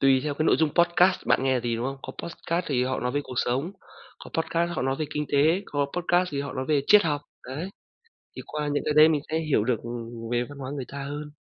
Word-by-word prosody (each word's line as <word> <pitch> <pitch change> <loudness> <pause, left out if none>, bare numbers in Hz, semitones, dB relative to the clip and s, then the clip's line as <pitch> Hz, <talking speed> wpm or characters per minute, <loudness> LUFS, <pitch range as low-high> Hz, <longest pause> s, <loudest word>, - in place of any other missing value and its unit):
tùy 135 -1 +5
theo 150 -1 -1
cái 155 +2 -1
nội - - +5
dung 160 -2 +2
podcast 175 +2 +3
bạn - - +4
là - - -2
nghe 130 -1 +2
gì, 115 -1 -1
đúng 115 - -3
hông? 135 +1 -3
Có 130 - -7
podcast 170 +1 -3
thì 125 -4 +1
họ 130 +1 -1
nói 125 - -1
về 145 - 0
cuộc 130 - -8
sống, 135 +10 -1 0.5
có - - -11
podcast 165 +1 0
họ - - -1
nói 135 +1 0
về 155 - 0
kinh 150 - 0
tế, 160 +7 +4
có 145 -1 0
podcast 180 +1 +2
thì 140 - -1
họ 140 -1 -5
nói 130 - -3
về 150 -2 +3
triết 210 -1 +7
học, 150 -3 0 0.3
đấy. 145 +8 -5 0.7
Thì - - -6
qua 150 -1 -3
những 145 - 0
cái 150 - 0
đấy 155 +1 +8
mình 155 -2 +2
sẽ 160 - 0
hiểu 155 -9 +1
được, 125 -1 +1
ừm, 115 -1 -6
về 120 0 +1
văn 145 -1 -10
hóa 130 -1 -5
người 135 - -4
ta 140 0 -6
hơn. 145 +2 -6
145 Hz, 275 wpm, -26 LUFS, 130-160 Hz, 0.7 s, đấy